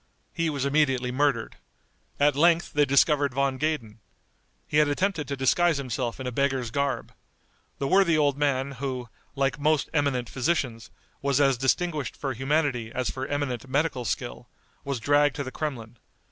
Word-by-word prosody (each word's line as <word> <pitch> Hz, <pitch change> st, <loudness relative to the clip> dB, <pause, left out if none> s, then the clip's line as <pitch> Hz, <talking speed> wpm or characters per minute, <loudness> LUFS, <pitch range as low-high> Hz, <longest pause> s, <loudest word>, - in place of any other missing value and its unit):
He 165 Hz, -1 st, 0 dB
was 140 Hz, -3 st, -2 dB
immediately 135 Hz, -4 st, +1 dB
murdered. 130 Hz, -3 st, 0 dB, 0.6 s
At 145 Hz, -1 st, +4 dB
length 170 Hz, +3 st, +3 dB
they 145 Hz, 0 st, +4 dB
discovered 140 Hz, -1 st, +3 dB
Von 135 Hz, -1 st, 0 dB
Gaden. 130 Hz, -8 st, -2 dB, 0.7 s
He 150 Hz, -, -1 dB
had 150 Hz, -1 st, +5 dB
attempted 160 Hz, 0 st, -1 dB
to 140 Hz, 0 st, -3 dB
disguise 165 Hz, +5 st, +3 dB
himself 125 Hz, -2 st, -3 dB
in 130 Hz, -, -5 dB
a 125 Hz, -, -2 dB
beggar's 130 Hz, -2 st, 0 dB
garb. 140 Hz, +1 st, -2 dB, 0.6 s
The 140 Hz, -, -2 dB
worthy 180 Hz, 0 st, +4 dB
old 145 Hz, -2 st, +2 dB
man, 140 Hz, -2 st, 0 dB
who, 130 Hz, -2 st, -5 dB, 0.3 s
like 135 Hz, -1 st, 0 dB
most 150 Hz, 0 st, +1 dB
eminent 140 Hz, -5 st, 0 dB
physicians, 130 Hz, -4 st, -2 dB, 0.3 s
was 140 Hz, 0 st, +1 dB
as 135 Hz, -2 st, +4 dB
distinguished 145 Hz, +4 st, -1 dB
for 135 Hz, -2 st, -3 dB
humanity 130 Hz, -3 st, 0 dB
as 130 Hz, 0 st, -2 dB
for 130 Hz, 0 st, -5 dB
eminent 135 Hz, -4 st, -3 dB
medical 140 Hz, -2 st, 0 dB
skill, 65 Hz, -, -4 dB, 0.3 s
was 140 Hz, -3 st, -3 dB
dragged 145 Hz, +2 st, +3 dB
to 140 Hz, -, -3 dB
the 130 Hz, -, -6 dB
Kremlin. 120 Hz, -7 st, -5 dB
140 Hz, 160 wpm, -26 LUFS, 130-145 Hz, 0.7 s, had